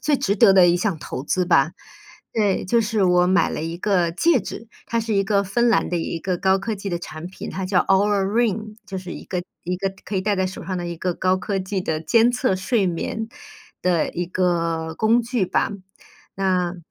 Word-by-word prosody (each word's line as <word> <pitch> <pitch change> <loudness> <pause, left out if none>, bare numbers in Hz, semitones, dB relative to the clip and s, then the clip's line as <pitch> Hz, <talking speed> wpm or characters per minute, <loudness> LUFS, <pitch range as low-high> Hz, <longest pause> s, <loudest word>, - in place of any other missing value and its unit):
最 300 -2 +2
值 200 -5 0
得 195 -1 +6
的 185 -2 +7
一 175 - +4
项 180 -2 -1
投 130 - -6
资 180 +5 0
吧。 165 -3 +3 0.6
对， 205 -3 +1
就 230 +5 +2
是 215 -2 +1
我 180 0 +4
买 190 +2 +3
了 - - -4
一 165 +1 -4
个 180 -4 +1
戒 305 - +3
指， 215 +3 -8 0.2
它 230 0 0
是 225 -1 -2
一 195 0 +2
个 200 0 +2
芬 235 +5 +1
兰 230 - +2
的 175 - -1
一 165 0 -3
个 185 +1 -1
高 190 +2 +2
科 220 +3 -3
技 200 0 -6
的 175 -2 -2
产 165 -1 -8
品， 185 - -8
它 190 - -4
叫 185 -1 +3
Oura 200 +1 +2
Ring， 215 0 0
就 190 - -5
是 185 -1 -7
一 - - -8
个 180 -1 -3 0.2
一 180 +1 -2
个 195 +1 -2
可 210 - -6
以 - - +1
戴 205 +1 0
在 190 0 +1
手 185 - -7
上 185 - -3
的 175 - -4
一 170 0 -5
个 180 +1 -2
高 185 +1 +1
科 195 +1 -2
技 190 +1 -2
的 160 -3 -2
监 230 +9 +4
测 245 -4 +1
睡 195 +2 +1
眠 220 +6 -3 0.5
的 175 -3 +2
一 175 0 -3
个 165 -3 -1
工 230 +2 +3
具 235 -4 -1
吧。 - - 0 0.6
那 185 -2 0
190 Hz, 265 characters per minute, -22 LUFS, 180-210 Hz, 0.6 s, 的